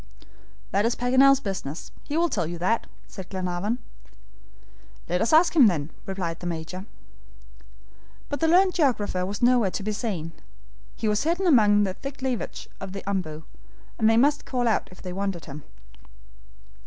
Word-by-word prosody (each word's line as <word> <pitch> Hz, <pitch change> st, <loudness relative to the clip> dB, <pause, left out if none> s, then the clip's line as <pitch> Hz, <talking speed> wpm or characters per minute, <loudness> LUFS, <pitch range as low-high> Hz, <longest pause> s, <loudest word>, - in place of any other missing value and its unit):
"That's 215 Hz, +5 st, +2 dB
Paganel's 260 Hz, +2 st, +5 dB
business; 180 Hz, -, -5 dB
he 295 Hz, -, -3 dB
will 340 Hz, +1 st, +3 dB
tell 170 Hz, -, -1 dB
you 170 Hz, +1 st, -5 dB
that," 190 Hz, +7 st, 0 dB, 0.2 s
said 190 Hz, -2 st, -10 dB
Glenarvan. 185 Hz, +4 st, -2 dB, 1.3 s
"Let's 180 Hz, +7 st, 0 dB
ask 330 Hz, +2 st, +5 dB
him, 275 Hz, -8 st, +8 dB
then," 160 Hz, -5 st, -1 dB, 0.2 s
replied 180 Hz, -4 st, -3 dB
the 175 Hz, -, -5 dB
Major. 175 Hz, +4 st, -5 dB, 1.4 s
But 285 Hz, -, -4 dB
the 325 Hz, -, +2 dB
learned 365 Hz, +3 st, +5 dB
geographer 230 Hz, -, +1 dB
was 205 Hz, +4 st, -4 dB
nowhere 240 Hz, -4 st, +4 dB
to 195 Hz, -, -4 dB
be 215 Hz, -, -1 dB
seen. 200 Hz, -7 st, -3 dB, 0.6 s
He 220 Hz, -, -2 dB
was 210 Hz, 0 st, +2 dB
hidden 345 Hz, +5 st, 0 dB
among 210 Hz, -, +5 dB
the 190 Hz, -2 st, -1 dB
thick 275 Hz, +5 st, -8 dB
leafage 255 Hz, -3 st, -3 dB
of 195 Hz, -1 st, -7 dB
the 195 Hz, -, -6 dB
OMBU, 160 Hz, -6 st, -3 dB, 0.6 s
and 220 Hz, -1 st, +4 dB
they 225 Hz, -, +4 dB
must 290 Hz, +4 st, +3 dB
call 245 Hz, -2 st, -1 dB
out 225 Hz, -, +1 dB
if 185 Hz, -, -14 dB
they 180 Hz, -1 st, -5 dB
wanted 195 Hz, -3 st, -3 dB
him. 150 Hz, +1 st, -8 dB
205 Hz, 160 wpm, -25 LUFS, 180-260 Hz, 1.4 s, him